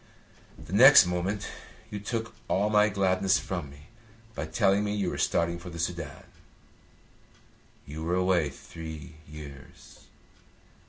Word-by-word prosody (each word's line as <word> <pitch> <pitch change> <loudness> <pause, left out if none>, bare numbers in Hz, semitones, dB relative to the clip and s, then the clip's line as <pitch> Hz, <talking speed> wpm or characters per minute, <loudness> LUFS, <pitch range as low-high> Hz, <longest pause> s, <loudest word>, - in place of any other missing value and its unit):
The 90 - -11
next 130 +1 +9
moment 90 +4 -2 0.4
you 105 - -4
took 115 +2 -4
all 105 +3 +1
my 105 0 +4
gladness 95 -1 +2
from 75 -2 -4
me 70 +1 -15 0.5
by 75 -4 -4
telling 100 +4 +2
me 105 0 -2
you 100 -4 -1
were - - -5
starting 85 0 0
for 85 - -9
the 85 - -9
Soudan. 85 -3 -4 1.6
You 75 +2 -8
were 85 +2 0
away 90 -4 +2
three 80 +2 -10
years. 70 -3 -12
90 Hz, 130 wpm, -28 LUFS, 80-100 Hz, 1.6 s, next